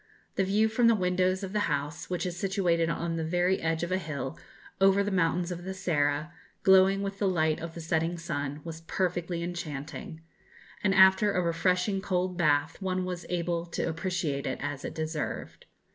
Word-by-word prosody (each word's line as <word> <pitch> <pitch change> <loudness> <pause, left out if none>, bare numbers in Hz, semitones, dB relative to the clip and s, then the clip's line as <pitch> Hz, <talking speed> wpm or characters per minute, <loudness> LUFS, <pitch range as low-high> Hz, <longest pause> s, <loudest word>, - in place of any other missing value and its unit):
The 195 - +2
view 205 +3 +3
from 230 +2 +3
the 230 - +6
windows 185 0 +1
of 190 0 -5
the 210 - +1
house, 150 +3 -3
which 180 +1 -2
is 180 -1 -3
situated 175 -3 +1
on 165 0 -2
the 160 - -1
very 175 +3 +1
edge 160 0 0
of 175 - -3
a 185 - +2
hill, 145 -6 -4 0.5
over 195 +1 +5
the 205 - -2
mountains 175 -1 +1
of 175 0 -5
the 190 +1 -5
Serra, 155 -3 0 0.3
glowing 190 +1 +5
with 195 0 -4
the 200 - +2
light 160 -4 +1
of 165 0 -7
the 170 - -6
setting 165 +1 0
sun, 145 -4 -4
was 165 -1 -7
perfectly 175 0 -2
enchanting; 165 +1 -6 0.6
and 195 -2 +3
after 190 +2 +6
a 180 - +2
refreshing 180 +3 +1
cold 185 -1 -1
bath 150 -1 +1
one 185 -1 -1
was 180 -1 -5
able 170 -1 -1
to 170 - -2
appreciate 165 -4 -2
it - - -2
as 145 0 -4
it - - -5
deserved. 155 -1 -4
175 Hz, 190 wpm, -29 LUFS, 160-190 Hz, 0.6 s, the